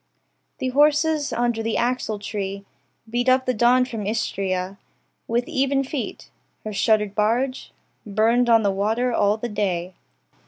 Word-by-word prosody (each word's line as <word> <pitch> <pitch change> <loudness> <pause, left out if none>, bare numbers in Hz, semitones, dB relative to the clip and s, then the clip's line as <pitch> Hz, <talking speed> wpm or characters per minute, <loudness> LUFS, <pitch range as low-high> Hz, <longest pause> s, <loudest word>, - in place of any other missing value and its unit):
The 260 - -2
horses, 295 +2 +2
under 240 -1 0
the 225 0 -2
axletree 205 -5 -2 0.4
Beat 240 +3 0
up 260 0 +3
the 255 - +1
dawn 245 +2 +4
from 225 -6 -5
Istria 195 -3 -2 0.5
With 240 +2 0
even 275 +1 +1
feet. 270 -1 -6 0.3
Her 215 - -5
shuttered 210 0 +2
barge 235 +5 0 0.3
Burned 225 +4 +2
on 225 -1 +5
the 200 - +2
water 220 +6 0
all 205 -1 +2
the 240 - -4
day. 190 -4 -2
225 Hz, 140 wpm, -23 LUFS, 205-255 Hz, 0.5 s, on